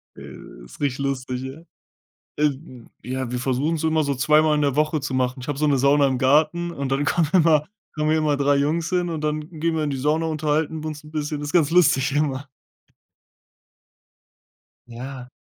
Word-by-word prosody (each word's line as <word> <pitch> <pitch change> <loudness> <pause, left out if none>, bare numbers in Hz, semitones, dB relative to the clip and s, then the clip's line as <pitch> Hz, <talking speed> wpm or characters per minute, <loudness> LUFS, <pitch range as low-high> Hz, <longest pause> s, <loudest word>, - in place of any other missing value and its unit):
Äh, - - -12
ist - - -15
richtig 140 -2 -1
lustig, 130 -2 -3
ja. 130 +2 -7 0.8
Äh, 150 0 +3
d 130 -4 -12 0.2
ja, 130 -1 -4
wir 125 - -2
versuchen 135 +6 0
es 160 - -5
immer 160 0 +2
so 140 -1 -1
2 150 +4 +4
Mal 155 -1 +2
in 150 - +1
der 140 -2 0
Woche 155 +1 +1
zu 135 -1 -4
machen. 130 0 -1
Ich 125 - -9
habe 145 -2 -2
so 150 - +1
'ne 140 -2 +2
Sauna 140 +2 +4
im 130 -2 0
Garten 155 +6 +2
und 140 -5 -4
dann 140 +2 +1
kommen 160 +1 +1
immer 160 -4 +4 0.3
kommen 150 -1 -1
hier 160 - +3
immer 150 -2 +1
3 140 0 +2
Jungs 155 +4 0
hin, 180 -1 0
und 160 -2 -3
dann 150 0 -2
gehen 165 0 0
wir 155 - 0
in 145 - -2
die 135 - -2
Sauna, 150 +5 0
unterhalten 155 0 -1
wir 155 - -4
uns 150 -1 -7
'n 150 - -13
bisschen. 150 -1 -3
Ist 145 0 -5
ganz 165 -5 +3
lustig 150 -5 +3
immer. 145 -2 -1 2.4
Ja. 125 +1 -8
145 Hz, 210 wpm, -23 LUFS, 135-155 Hz, 2.4 s, 2